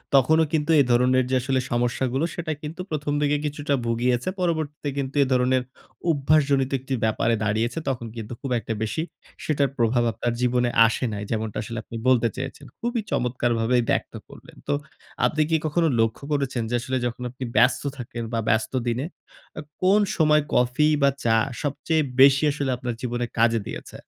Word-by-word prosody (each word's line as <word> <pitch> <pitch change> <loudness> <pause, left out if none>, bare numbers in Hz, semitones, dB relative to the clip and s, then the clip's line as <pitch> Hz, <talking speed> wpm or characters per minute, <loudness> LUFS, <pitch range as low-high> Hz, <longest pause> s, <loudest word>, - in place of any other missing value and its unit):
তখনও 160 +5 +5
কিন্তু 155 +1 +1
এ - - +5
ধরনের 125 +1 +4
যে 130 - +1
আসলে 130 0 0
সমস্যাগুলো 125 +4 0
সেটা 165 -2 -3
কিন্তু 160 +4 -6
১ম 150 -1 -2
দিকে 145 0 +2
কিছুটা 145 -1 -2
ভুগিয়েছে। 120 +5 0
পরবর্তীতে 155 -4 -1
কিন্তু 135 0 -3
এ - - 0
ধরনের 125 0 +2 0.5
অভ্যাসজনিত 140 -2 +2
একটি 130 +1 -5
ব্যাপারে 115 +1 +2
দাঁড়িয়েছে। 110 +7 0
তখন 120 -3 -3
কিন্তু 115 +1 -6
খুব 135 -3 -5
একটা 115 - -4
বেশি 110 +8 -2 0.4
সেটার 140 -3 +1
প্রভাব 120 +1 +2
আপনার 120 +1 -2
জীবনে 125 0 +2 0.2
আসে 115 - -2
নাই। 105 0 -4
যেমনটা 110 -1 -2
আসলে 115 +1 -6
আপনি 115 - -10
বলতে 120 -2 +4
চেয়েছেন। - - -6
খুবই 240 -1 -1
চমৎকারভাবেই 120 -1 +1
ব্যক্ত - - -1
করলেন। - - -15
তো - - +1 0.5
আপনি 155 - +1
কি 160 - +3
কখনো 165 +2 +2
লক্ষ্য 115 +4 0
করেছেন 135 -4 -1
যে 120 - 0
আসলে 130 +1 -2
যখন 120 +1 -4
আপনি 130 0 -8
ব্যস্ত 125 +1 +4
থাকেন 120 -1 -6
বা 115 - +1
ব্যস্ত 110 +2 +1
দিনে, 120 +5 -1 0.5
আ - - -3 0.2
কোন 195 +3 +5 0.2
সময় 150 -2 +4
কফি 125 +5 +3
বা 140 - +5
চা 115 -1 +3 0.3
সবচেয়ে 155 +2 0 0.2
বেশি 135 +1 +7
আসলে 140 -2 -2
আপনার 125 -1 -3
জীবনে 120 -1 -2
কাজে 115 0 +4
দিয়েছে? - - -8
130 Hz, 170 wpm, -24 LUFS, 120-145 Hz, 0.5 s, বেশি